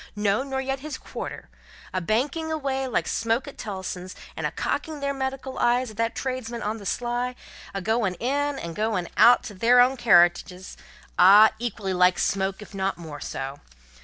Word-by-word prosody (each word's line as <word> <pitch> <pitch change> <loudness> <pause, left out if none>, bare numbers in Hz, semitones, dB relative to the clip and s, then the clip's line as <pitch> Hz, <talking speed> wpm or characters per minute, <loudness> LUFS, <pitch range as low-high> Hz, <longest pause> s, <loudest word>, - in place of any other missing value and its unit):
no, 205 +2 +1
nor 265 -1 -3
yet 270 0 -2
his 305 +2 -6
quarter - - -7 0.5
a 185 - -1
banking 275 - -1
away 270 -4 -2
like 250 - -1
smoke 230 +5 0
at 285 - -9
Tellson's, 190 -3 -6 0.2
and - - -1
a - - -6
cocking 310 -2 -3
their 280 0 -1
medical 265 0 -4
eyes 245 0 +2
at 215 - -15
that 230 0 -1
tradesman 250 -3 -4
on 215 +2 -2
the 200 - -7
sly, 245 +2 -2 0.4
a 195 - -4
going 220 -3 0
in 285 +7 -1
and 170 -6 -6
going 210 -5 -1
out 245 - +6
to 210 - -7
their 235 +6 +4
own 255 +2 +5
carriages 180 -4 +3 0.4
ah! 205 +4 +8
equally 205 -5 -3
like 180 0 +4
smoke, 195 +1 -1
if 210 - -15
not 195 -1 -2
more 155 -4 -8
so. 135 +1 -5
230 Hz, 180 wpm, -25 LUFS, 190-265 Hz, 0.5 s, ah